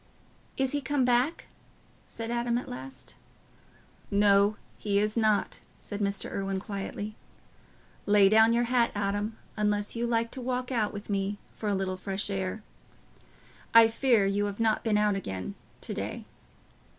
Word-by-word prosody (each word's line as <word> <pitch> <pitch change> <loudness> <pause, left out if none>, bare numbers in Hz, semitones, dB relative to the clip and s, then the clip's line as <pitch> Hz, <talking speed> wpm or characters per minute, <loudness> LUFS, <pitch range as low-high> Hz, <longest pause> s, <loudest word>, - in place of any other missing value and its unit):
"Is 265 -1 +1
he 290 - -1
come 270 -1 +1
back?" 250 +6 +1 0.6
said 230 0 -5
Adam 240 0 0
at 245 - -5
last. 130 +1 -9 0.9
"No, 200 +1 +4 0.2
he 200 -1 0
is 210 +1 +1
not," 215 -3 +1 0.2
said 205 - -6
Mr. 200 -1 -1
Irwine, 195 -1 -2
quietly. 205 +1 -5 0.9
"Lay 205 -1 +6
down 220 +2 +6
your 235 +1 +3
hat, 240 -1 +2
Adam, 205 +2 -1 0.2
unless 210 0 0
you 235 +1 -1
like 230 -1 0
to 260 - -5
walk 250 +1 -2
out 220 -4 +1
with 205 0 -8
me 200 0 -1 0.2
for 215 - -3
a 200 - +1
little 190 -1 -2
fresh 195 +2 -3
air. 190 +2 -3 1.1
I 230 -1 +9
fear 230 -3 +3
you 200 +1 +1
have 205 +1 -4
not 220 -1 +2
been 220 -2 +2
out 210 0 +3
again 95 - -4 0.3
to - - -5
day." - - -5
210 Hz, 155 wpm, -28 LUFS, 200-235 Hz, 1.1 s, I